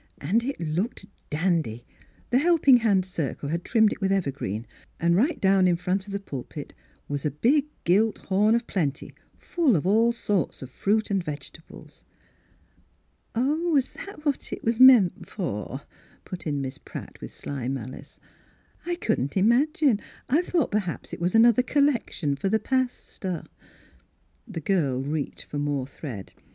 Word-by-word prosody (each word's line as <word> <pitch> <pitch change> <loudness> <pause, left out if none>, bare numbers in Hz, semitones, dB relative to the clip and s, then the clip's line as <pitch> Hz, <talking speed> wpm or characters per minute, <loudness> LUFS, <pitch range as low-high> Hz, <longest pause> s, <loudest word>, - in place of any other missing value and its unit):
And 205 +11 +1
it 275 +3 -3
looked 170 +8 -2 0.2
dandy; 155 -8 -1 0.5
the 250 - +4
Helping 300 -5 +5
Hand 205 -5 +2
Circle 155 -5 -4
had 170 +3 -2
trimmed 220 -3 +3
it - - -12
with 195 0 +1
evergreen, 140 - -2 0.3
and 170 +1 +3
right 285 - +2
down 190 -1 +4
in 175 - +3
front 185 +3 -2
of - - -8
the 200 - -2
pulpit 140 -10 -7 0.3
was 145 -1 -3
a 150 - +1
big 265 - +2 0.2
gilt 210 +5 +3
horn 210 +4 +2
of 235 0 0
plenty 150 - -2 0.2
full 325 - +1
of 155 - 0
all 225 +5 +4
sorts 205 - -1
of 130 - -10
fruit 210 +8 0
and 195 -2 +1
vegetables." 145 -4 -9 0.7
" - - -37
Oh, 300 +8 +1
was 280 -5 +2
that 315 -6 -10
what 285 -3 -1
it - - -5
was 230 +1 0
meant 250 -9 +6
for," 135 - -4 0.4
put 180 -3 -7
in 145 -2 -1
Miss 130 -1 -5
Pratt, - - -9
with - - -7
sly 135 -4 -5
malice; 130 -1 -6 0.3
" - - -34
I 350 - 0
couldn't 200 - -1
imagine; 260 - +3 0.3
I 295 +7 +3
thought 345 -5 0
perhaps 200 -5 -3
it - - -6
was 180 +4 0
another 235 +1 +6
collection 250 - +1
for 195 +7 -2
the 220 - +3
pastor." 245 -8 -2 1.0
The 185 -8 -6
girl 140 -8 0
reached 150 +1 -3
for 145 - -5
more 145 -2 -1
thread. 130 -7 -8
195 Hz, 165 wpm, -26 LUFS, 145-235 Hz, 1.0 s, meant